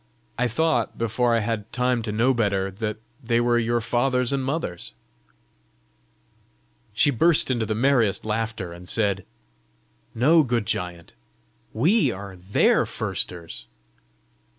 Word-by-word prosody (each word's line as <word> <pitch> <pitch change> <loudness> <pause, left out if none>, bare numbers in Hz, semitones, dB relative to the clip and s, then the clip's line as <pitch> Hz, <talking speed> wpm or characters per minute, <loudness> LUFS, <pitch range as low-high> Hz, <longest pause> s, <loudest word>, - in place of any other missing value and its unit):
I 125 +1 +1
thought, 150 -1 0
before 115 +1 +1
I 115 - +1
had 110 -1 -3
time 125 -1 0
to 110 -1 -4
know 120 +5 +2
better, 100 -5 0
that 105 +2 -4 0.3
they 115 0 +1
were 120 0 +2
your 120 0 0
fathers 125 +2 +1
and 135 -1 -1
mothers." 135 - -4 2.0
She 145 +5 +4
burst 150 +2 +3
into 115 -3 -1
the 110 - -1
merriest 120 -5 +2
laughter, 110 -4 -3
and 90 +1 -10
said, 100 -4 0 0.9
"No, 155 +8 +5
good 120 -6 -1
giant; 85 -3 -4 0.6
WE 155 - +2
are 100 -1 -8
THEIR 95 +2 +2
firsters." 85 -7 -4
115 Hz, 130 wpm, -24 LUFS, 105-125 Hz, 2.0 s, No